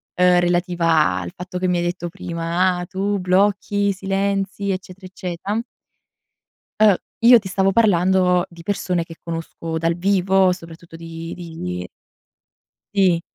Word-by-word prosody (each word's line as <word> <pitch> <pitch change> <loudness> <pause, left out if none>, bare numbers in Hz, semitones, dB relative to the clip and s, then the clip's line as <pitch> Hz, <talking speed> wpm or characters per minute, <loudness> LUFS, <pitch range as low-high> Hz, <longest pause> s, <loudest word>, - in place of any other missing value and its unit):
ehm, 180 0 +5
relativa 175 - +2
al 90 -1 -6
fatto 180 0 -6
che 185 - 0
mi 180 - +1
hai 175 - 0
detto 175 0 -3
prima: 170 +2 -1
"Ah, 180 - -4
tu 200 +2 -2
blocchi, 200 +2 +1
silenzi, 195 +1 -1
eccetera, 185 0 -7
eccetera" 185 +4 -4 1.2
Uh, 215 -2 +7 0.3
io 240 +1 +8
ti 195 - -8
stavo 190 +1 +1
parlando 185 -3 +3
di 170 -1 -13
persone 180 -2 -1
che 165 - -11
conosco 165 0 -5
dal 165 +1 0
vivo, 190 0 +3
soprattutto 165 -1 -9
di 165 0 -7
di 90 - -6 1.1
Sì. 180 -4 +3
180 Hz, 135 wpm, -21 LUFS, 170-195 Hz, 1.2 s, io